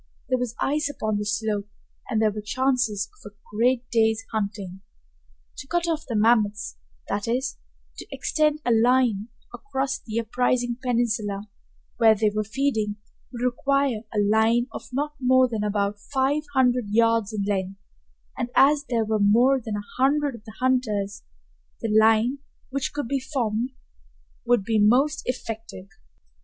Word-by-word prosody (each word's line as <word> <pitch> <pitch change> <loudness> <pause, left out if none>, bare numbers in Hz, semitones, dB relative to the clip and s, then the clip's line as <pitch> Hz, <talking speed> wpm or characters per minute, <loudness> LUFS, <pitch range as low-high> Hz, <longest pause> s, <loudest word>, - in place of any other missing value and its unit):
There 255 -1 +2
was 245 -2 -3
ice 295 +1 0
upon 215 -7 -2
the 210 - -3
slope 210 -1 -1 0.4
and 225 -4 +1
there 215 -1 +3
were 210 +1 -5
chances 240 -3 0 0.2
of 205 - -10
a - - -36 0.2
great 245 +2 +2
day's 225 -1 +2
hunting. 200 -3 -4 0.8
To 265 - -8
cut 345 +2 0
off 320 -1 -2
the 235 - -3
mammoths, 210 - +2 0.3
that 205 - -2
is, 255 +3 -1 0.4
to - - -9
extend 305 -1 0
a 240 - +2
line 230 -2 +3 0.3
across 265 +2 -3
the 220 0 -3
uprising 245 +1 0
peninsula 220 -5 -1 0.5
where 225 -1 +6
they 215 0 +1
were 215 0 0
feeding, 220 -2 -1 0.4
would 240 -1 -5
require 270 -1 +1
a 220 - -4
line 220 +3 +3
of - - -8
not 290 +4 -2
more 260 0 +4
than 220 -3 -3
about 205 0 -1
five 280 +5 0
hundred 250 -2 +3
yards 230 0 +2
in 210 -2 -2
length, 195 -1 -2 0.6
and 240 - -3
as 285 +2 +5
there 230 -4 0
were 215 0 0
more 240 +6 +4
than 220 -2 -3
a 205 0 -5 0.2
hundred 285 +1 +2
of 230 -3 -11
the 220 -1 -11
hunters, 215 -6 0 0.6
the 220 -2 -1
line 225 +5 +4 0.3
which 275 0 -2
could 290 -4 -4
be 275 +2 0
formed 245 -3 -2 0.8
would 240 -4 +3
be 220 +1 +1
most 265 +8 +3
effective. 225 -6 -5
230 Hz, 155 wpm, -25 LUFS, 210-260 Hz, 0.8 s, where